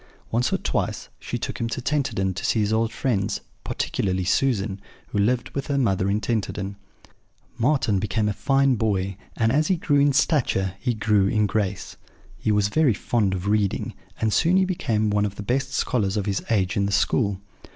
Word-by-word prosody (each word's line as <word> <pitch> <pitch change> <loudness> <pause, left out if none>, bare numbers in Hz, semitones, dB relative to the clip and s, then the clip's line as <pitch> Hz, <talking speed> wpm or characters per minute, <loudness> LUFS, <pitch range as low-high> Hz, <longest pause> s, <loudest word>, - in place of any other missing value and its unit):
Once 120 +3 +1
or - - +2
twice - - -2
she - - -4
took - - -5
him 115 - -1
to 120 - -3
Tenterden 125 -9 0
to 90 - -6
see 115 - +1
his 105 0 +1
old 110 +1 +1
friends, 105 -7 -1 0.2
particularly 95 -1 -1
Susan, 100 0 0 0.3
who 105 - -1
lived 120 +4 +1
with 140 - -4
her 140 - 0
mother 100 -7 +1
in 100 +2 +1
Tenterden. 100 -3 -2 0.8
"Marten 120 -6 +2
became 105 +1 0
a 105 - 0
fine 135 +5 +2
boy; 100 -4 0 0.2
and 115 -1 +2
as 150 +4 +2
he 190 - +3
grew 145 -4 +1
in 145 0 +4
stature 130 - +1
he 125 -3 -1
grew 105 -2 +2
in 105 +1 +2
grace. 100 -2 -2 0.4
He 110 - 0
was 105 -1 +3
very 145 -4 +3
fond 100 -1 0
of 90 0 -5
reading; 105 -2 0 0.3
and 110 -1 +1
soon 170 +3 +3
he 190 - +4
became 110 - 0
one 105 0 +2
of 100 -1 -2
the 105 - -6
best 130 +4 -1
scholars 110 -6 0
of 100 - -1
his 100 -2 -1
age 95 -5 +1
in 100 -1 +1
the - - -2
school. 100 -1 +1
110 Hz, 195 wpm, -24 LUFS, 100-130 Hz, 0.8 s, in